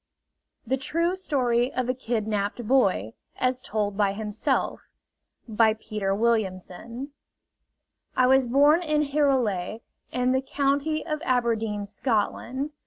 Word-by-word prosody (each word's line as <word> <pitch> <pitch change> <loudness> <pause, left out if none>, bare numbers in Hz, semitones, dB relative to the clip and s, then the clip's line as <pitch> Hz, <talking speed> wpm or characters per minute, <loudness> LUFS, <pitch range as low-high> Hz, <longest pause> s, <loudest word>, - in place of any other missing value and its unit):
THE 260 +3 0
TRUE 335 +7 0
STORY 250 -9 +1
OF 255 -1 0
A 255 - +1
KIDNAPPED 220 -2 -2
BOY 195 - +2 0.2
AS 255 0 0
TOLD 210 -5 -2
BY 200 -1 +2
HIMSELF 210 +1 -1 0.7
By 220 -1 +3
Peter 210 -3 -2
Williamson 225 +3 -2 1.1
I 255 - +5
was 265 0 +4
born 290 +6 +5
in 305 -3 +1
Hirulay, 255 -9 0 0.3
in 250 0 +1
the 260 0 +2
county 285 +3 0
of 305 -2 -3
Aberdeen, 225 -6 0
Scotland. 245 +6 -2
245 Hz, 115 wpm, -26 LUFS, 215-270 Hz, 1.1 s, I